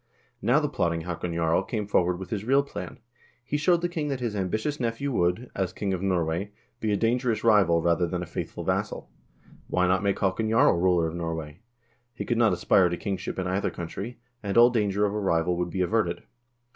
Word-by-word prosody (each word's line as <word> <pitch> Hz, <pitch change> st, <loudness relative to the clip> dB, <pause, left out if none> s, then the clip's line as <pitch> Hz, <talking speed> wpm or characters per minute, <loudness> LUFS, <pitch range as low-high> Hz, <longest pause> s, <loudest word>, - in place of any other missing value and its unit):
Now 125 Hz, +8 st, +4 dB
the 150 Hz, -, 0 dB
plotting 85 Hz, -, -1 dB
Haakon 85 Hz, 0 st, -4 dB
Jarl 85 Hz, +1 st, +2 dB
came 105 Hz, +1 st, -3 dB
forward 90 Hz, -3 st, +1 dB
with 95 Hz, 0 st, -8 dB
his 105 Hz, -3 st, -2 dB
real 135 Hz, +4 st, +3 dB
plan. 140 Hz, -, -7 dB, 0.5 s
He 140 Hz, -, -3 dB
showed 170 Hz, +4 st, +3 dB
the -, -, +2 dB
king 160 Hz, -4 st, -3 dB
that 135 Hz, -3 st, -2 dB
his 120 Hz, -4 st, -3 dB
ambitious 110 Hz, +10 st, -2 dB
nephew 120 Hz, +3 st, -2 dB
would, 90 Hz, +3 st, 0 dB
as 95 Hz, -2 st, -2 dB
king 100 Hz, -1 st, -2 dB
of 90 Hz, -, -3 dB
Norway, 90 Hz, 0 st, 0 dB, 0.3 s
be 110 Hz, -2 st, -1 dB
a 100 Hz, -, +2 dB
dangerous 115 Hz, +1 st, 0 dB
rival 95 Hz, -7 st, +4 dB
rather 85 Hz, 0 st, +2 dB
than 90 Hz, +1 st, -3 dB
a -, -, -5 dB
faithful 85 Hz, -, -5 dB
vassal; -, -, -2 dB, 0.6 s
why 90 Hz, -, +1 dB
not 95 Hz, +2 st, +2 dB
make 100 Hz, -1 st, 0 dB
Haakon 100 Hz, +3 st, 0 dB
Jarl 115 Hz, -, +5 dB
ruler 90 Hz, -2 st, +3 dB
of 80 Hz, -, -3 dB
Norway? 80 Hz, -2 st, -5 dB, 0.6 s
He -, -, -5 dB
could 120 Hz, -1 st, 0 dB
not 115 Hz, -3 st, +5 dB
aspire 90 Hz, +1 st, +3 dB
to 85 Hz, -, -3 dB
kingship 100 Hz, -2 st, -4 dB
in 95 Hz, -, -2 dB
either 95 Hz, +2 st, 0 dB
country, 95 Hz, +7 st, -6 dB, 0.2 s
and 100 Hz, 0 st, -2 dB
all 120 Hz, +1 st, +8 dB
danger 105 Hz, -3 st, +1 dB
of 100 Hz, -, -1 dB
a 105 Hz, -, -1 dB
rival 90 Hz, -3 st, +1 dB
would 90 Hz, 0 st, -1 dB
be 95 Hz, +2 st, -2 dB
averted. 90 Hz, -3 st, 0 dB
95 Hz, 210 wpm, -26 LUFS, 85-115 Hz, 0.6 s, all